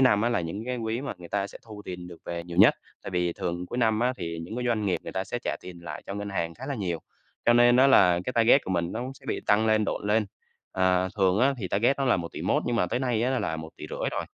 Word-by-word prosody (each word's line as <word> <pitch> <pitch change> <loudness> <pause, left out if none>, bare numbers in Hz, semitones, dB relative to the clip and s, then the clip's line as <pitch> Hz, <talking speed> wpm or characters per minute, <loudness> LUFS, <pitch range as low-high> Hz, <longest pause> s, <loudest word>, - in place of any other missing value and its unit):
năm 110 -6 +5
á 120 - +2
là 120 - +1
những 95 +7 -5
cái 125 0 -2
quý 115 +1 -2
mà 140 - -4
người 85 -1 -11
ta 100 -1 -1
sẽ - - -12
thu 105 -2 -9
tiền 90 -1 -6
được 85 -2 -11
về 85 -1 -4
nhiều 85 0 -8
nhất, - - +8 0.3
tại - - -6
vì 90 -2 0
thường 85 +1 -4
cuối 120 - -5
năm 110 -2 +2
á 125 +1 +2
thì 85 -2 -5
những 110 +8 -7
cái 125 - -2
doanh 110 -3 0
nghiệp 95 - 0
người - - -7
ta 95 - -2
sẽ 120 - -4
trả - - -3
tiền 90 -1 -10
lại - - -6
cho 100 - -5
ngân 100 0 -4
hàng 85 -4 -2
khá 130 +7 -9
là 140 - -2
nhiều, 90 -8 -3 0.5
cho 120 - +7
nên 120 +1 +6
á 130 - +6
là 90 -10 +5
cái 125 - -2
target 115 +4 +5
của - - -5
mình 85 -1 0
nó 115 - -3
cũng 130 +2 -5
sẽ - - -18
bị - - -2
tăng 110 +2 +4
lên, 110 -1 +3
độn 100 - -3
lên, 105 0 +2 0.5
ờ, 95 0 +2
thường 95 -1 +3
á 135 +4 +3
thì 95 -5 -4
target 120 +10 +2
nó 135 - +1
là 125 - +3
1.100.000.000 85 -2 -1
nhưng 120 -1 0
mà 90 - +2
tới 120 - -1
nay 120 -4 0
á 130 +1 +1
là 80 -7 -2
1.500.000.000, 80 0 -5
rồi. - - -2
105 Hz, 295 wpm, -27 LUFS, 90-120 Hz, 0.5 s, nhất